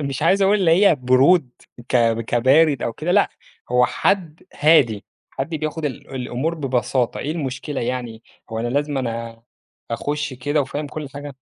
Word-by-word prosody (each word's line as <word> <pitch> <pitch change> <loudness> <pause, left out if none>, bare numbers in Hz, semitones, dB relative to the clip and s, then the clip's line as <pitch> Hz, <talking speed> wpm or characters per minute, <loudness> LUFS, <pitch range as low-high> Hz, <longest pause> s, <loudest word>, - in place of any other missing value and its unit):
مش 140 -1 -3
عايز 195 +5 +3
أقول 195 +2 +4
اللي 185 -5 +2 0.2
هي 175 - +6
برود 130 +3 +3 0.4
ك - - +2 0.2
كبارد 135 +6 +3
أو 115 - -2
كده، 160 +8 -2
لأ، 205 +1 +4 0.4
هو 125 0 +4
حد 170 +2 -1
هادي، 140 -9 +3 0.3
حد - - -5
بياخد 155 +1 -3
ال 135 -1 -5
الأمور 130 +5 -2
ببساطة، 130 -4 -1
إيه 145 - -3
المشكلة 140 -2 -4
يعني؟ 120 -2 -4 0.3
هو 110 - -4
أنا 120 - -2
لازمًا 145 +2 -1
أنا 115 -1 -5 0.5
آخُش 145 +4 -3
كده 145 +4 -1
وفاهم 145 +2 -3
كل 145 +1 -7
حاجة؟ 145 0 -8
140 Hz, 160 wpm, -21 LUFS, 125-155 Hz, 0.5 s, هي